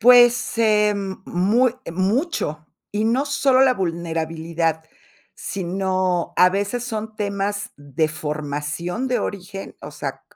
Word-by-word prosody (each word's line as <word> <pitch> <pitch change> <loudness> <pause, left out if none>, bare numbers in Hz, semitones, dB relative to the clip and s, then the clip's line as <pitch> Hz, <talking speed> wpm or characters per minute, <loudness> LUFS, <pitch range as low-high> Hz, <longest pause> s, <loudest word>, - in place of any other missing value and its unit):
Pues 245 +1 +6
em, 210 -3 +2
muy 225 +8 +2 0.2
mucho, 190 - 0 0.3
y 210 +1 0
no 255 +6 +2
solo 270 -2 +4
la 260 -1 +5
vulnerabilidad, 165 -2 -2 0.5
sino 185 -1 -1
a 180 - +7
veces 200 +5 -1
son 220 -2 -4
temas 200 0 -2
de 145 +2 -1
formación 155 - -3
de 250 - +1
origen, 195 0 -5
o - - -8
sea, - - -5
195 Hz, 115 wpm, -22 LUFS, 165-225 Hz, 0.5 s, a